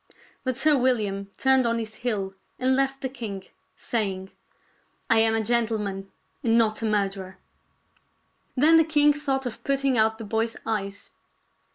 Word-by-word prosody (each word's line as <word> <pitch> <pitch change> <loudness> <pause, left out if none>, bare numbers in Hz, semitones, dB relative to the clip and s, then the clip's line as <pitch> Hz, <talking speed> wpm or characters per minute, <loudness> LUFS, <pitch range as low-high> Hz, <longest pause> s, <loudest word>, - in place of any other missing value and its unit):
But 255 -2 -2
Sir 300 +2 +4
William 210 -7 0
turned 265 -2 +3
on 230 0 0
his 220 -1 -5
heel 205 -6 -2 0.2
and 260 +1 +2
left 270 0 0
the 265 - -1
king, 225 -7 -6 0.3
saying, 195 -4 -3 0.4
" - - -41
I - - +5
am 225 0 +4
a 225 - 0
gentleman 210 -4 -1 0.3
and 230 -2 +2
not 220 -1 +2
a - - -1
murderer." 195 -2 -2 1.2
Then 315 +5 +6
the 325 - +6
king 295 -2 +4
thought 275 -2 -2
of 245 - -6
putting 275 -3 +1
out 220 0 +3
the 225 - -7
boy's 225 +2 -1
eyes. 205 -2 -4
225 Hz, 160 wpm, -25 LUFS, 205-265 Hz, 1.2 s, Then